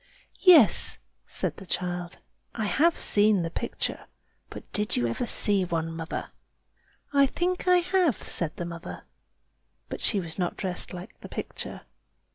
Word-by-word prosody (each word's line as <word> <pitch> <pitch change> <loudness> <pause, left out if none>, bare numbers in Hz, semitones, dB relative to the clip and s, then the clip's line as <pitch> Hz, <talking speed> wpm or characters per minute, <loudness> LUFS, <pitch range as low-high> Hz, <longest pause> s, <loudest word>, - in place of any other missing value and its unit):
"Yes," 330 - +6 0.3
said - - -3
the 195 - -10
child; 175 -1 -3 0.4
"I 220 - -2
have 325 +11 +2
seen 205 -3 +5
the 165 - -4
picture. - - -4 0.4
But - - -9
did 210 0 0
you 120 - +1
ever 120 - -2
see 200 -3 +3
one, 165 -2 -3
mother?" 165 -1 -5 0.8
"I 280 -1 +5
think 360 +6 -2
I 360 -1 +5
have," 360 - +1
said 165 -3 +1
the 175 - -5
mother; 170 - -8 0.9
"but - - -6
she 205 - +4
was 170 -1 -4
not 175 -1 -2
dressed 185 -3 -3
like 180 -1 -10
the - - -10
picture." - - -6
190 Hz, 150 wpm, -27 LUFS, 170-275 Hz, 0.9 s, Yes